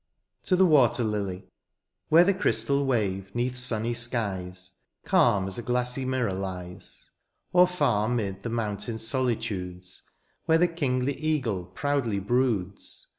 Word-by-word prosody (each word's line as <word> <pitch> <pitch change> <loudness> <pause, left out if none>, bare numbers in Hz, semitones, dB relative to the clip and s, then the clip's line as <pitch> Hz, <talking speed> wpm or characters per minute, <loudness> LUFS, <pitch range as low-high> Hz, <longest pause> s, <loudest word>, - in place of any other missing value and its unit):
TO 185 - +1
THE 190 +1 +5
WATER 130 -7 +4
LILY. 100 -4 -3 0.6
Where 165 +2 +7
the 200 +2 +3
crystal 140 -7 +1
wave, 95 -6 0
^neath 125 +1 -1
sunny 120 -2 -1
skies. 95 -7 -3 0.3
Calm 95 -2 +3
as 95 +4 -5
a - - -3
glassy 125 +2 -1
mirror 130 -6 0
lies; 90 -1 -7 0.4
Or 180 0 +7
fsur 125 -12 +1
^mid 100 -4 -3
the 115 - -4
mountain 110 -1 -2
soUtudes, 105 -7 -3 0.4
Where 160 - +4
the 175 +2 +4
kingly 140 -5 -1
eagle 135 - -1
proudly 120 +2 -1
broods. 100 -2 -1
115 Hz, 130 wpm, -27 LUFS, 95-130 Hz, 0.6 s, Where